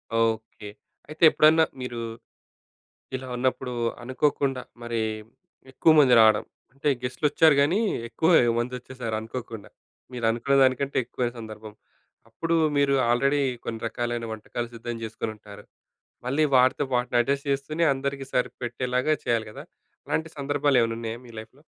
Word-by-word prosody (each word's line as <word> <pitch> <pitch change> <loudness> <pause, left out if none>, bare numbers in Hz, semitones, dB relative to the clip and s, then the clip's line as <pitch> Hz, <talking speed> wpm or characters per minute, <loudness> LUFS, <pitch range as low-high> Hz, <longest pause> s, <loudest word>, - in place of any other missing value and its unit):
Okay. 110 -2 -1 0.4
అయితే 155 +2 -6
ఎప్పుడన్నా 155 +2 +5 0.2
మీరు 120 -2 -5 1.2
ఇలా 130 0 -6
ఉన్నప్పుడు 125 0 -1 0.3
అనుకోకుండా 135 0 0 0.2
మరి 120 -1 -2 0.7
ఎక్కువ 160 +5 +4
మంది 130 -4 +6
రావడం, 110 -1 +5 0.3
అంటే 140 +2 -1
గెస్ట్‌లొచ్చారు 150 +3 +3
కానీ 170 +9 +2 0.3
ఎక్కువ 160 +8 0 0.3
మంది 120 +2 -2
వచ్చేసారు 120 -3 -5
అనుకోకుండా. 115 -1 -7 0.4
మీరనుకున్న 120 +3 0
దానికంటే 130 +2 +1
ఎక్కువైన 120 0 -3
సందర్భం. 110 -1 -9 0.6
అప్పుడు 165 0 -1 0.2
మీరు 140 -1 +3 0.2
ఆల్‌రెడీ 140 +4 +2 0.2
కొన్ని 115 -1 -5
రకాలైన 120 0 -3
వంటకాలు 115 +2 -5
సిద్ధం 120 +1 -5
చేసుకొని 110 0 -4
ఉంటారు. 105 -1 -13 0.6
మళ్ళీ 145 +4 +2
వాటితోపాటు 125 -1 +2
అడ్జస్ట్ 140 +3 -1
చేస్తూనే 155 +5 -1
అందరికి 135 0 -3
సరిపెట్టేలాగా 125 +3 -1
చేయాలి 115 -2 0
కదా! - - -9 0.4
అలాంటి 160 0 -1
సందర్భాలేమైనా 135 -5 +1
ఉన్నాయా 115 0 -5
మీ 120 - -13
లైఫ్‌లో? 120 +7 -12
125 Hz, 120 wpm, -25 LUFS, 115-140 Hz, 1.2 s, మంది